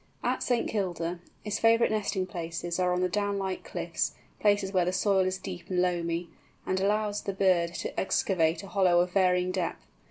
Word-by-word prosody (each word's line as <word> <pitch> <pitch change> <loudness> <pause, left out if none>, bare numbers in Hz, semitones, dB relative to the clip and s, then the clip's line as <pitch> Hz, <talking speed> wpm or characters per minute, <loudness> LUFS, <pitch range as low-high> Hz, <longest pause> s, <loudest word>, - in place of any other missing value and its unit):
At - - 0
St. 245 -2 +1
Kilda, 175 -4 -2 0.3
its 210 0 -1
favourite 230 0 +4
nesting 200 -3 0
places 170 0 -4
are 180 0 +2
on 180 0 +1
the 185 - +3
downlike 200 -1 -2
cliffs, - - -2 0.2
places 205 -2 +2
where 180 -2 +3
the 180 - +1
soil 190 0 +2
is 185 0 -1
deep 180 -2 -8
and 180 -1 0
loamy, 170 -1 0 0.4
and 185 - 0
allows 210 +1 0
the 195 - -3
bird 180 -3 +2
to - - -4
excavate 170 -3 +1
a - - -8
hollow 185 -4 +4
of 180 0 -1
varying 180 -1 +2
depth. 185 -2 -3
185 Hz, 185 wpm, -28 LUFS, 175-200 Hz, 0.4 s, favourite